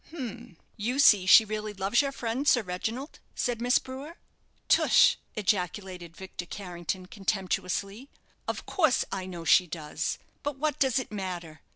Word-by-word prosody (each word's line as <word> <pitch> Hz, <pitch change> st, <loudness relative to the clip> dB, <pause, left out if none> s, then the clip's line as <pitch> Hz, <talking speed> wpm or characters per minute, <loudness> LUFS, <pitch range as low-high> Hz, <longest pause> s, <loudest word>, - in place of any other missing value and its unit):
"H -, -, -11 dB
m, 240 Hz, -6 st, -7 dB, 0.2 s
you 235 Hz, +5 st, -2 dB
see 205 Hz, -9 st, +6 dB
she 220 Hz, +3 st, +9 dB
really 215 Hz, 0 st, -4 dB
loves 195 Hz, +6 st, +2 dB
your 280 Hz, -1 st, -2 dB
friend, 255 Hz, +2 st, -3 dB
Sir 245 Hz, -5 st, +5 dB
Reginald," 220 Hz, -, -5 dB, 0.2 s
said 240 Hz, -2 st, -1 dB
Miss 245 Hz, +1 st, +4 dB
Brewer. 275 Hz, +6 st, -7 dB, 0.5 s
"Tush," -, -, +5 dB, 0.2 s
ejaculated 185 Hz, -3 st, -2 dB
Victor 190 Hz, -2 st, -7 dB
Carrington, 180 Hz, -1 st, -5 dB
contemptuously; 195 Hz, +4 st, -3 dB, 0.4 s
"of -, -, -3 dB
course 315 Hz, -8 st, +2 dB
I 190 Hz, -1 st, -4 dB
know 175 Hz, -3 st, -7 dB
she 180 Hz, +3 st, +5 dB
does, 160 Hz, 0 st, -3 dB, 0.2 s
but 290 Hz, -1 st, -3 dB
what 300 Hz, 0 st, -1 dB
does 265 Hz, -2 st, +2 dB
it 255 Hz, -, -2 dB
matter? 175 Hz, -6 st, -6 dB
205 Hz, 155 wpm, -28 LUFS, 180-250 Hz, 0.5 s, she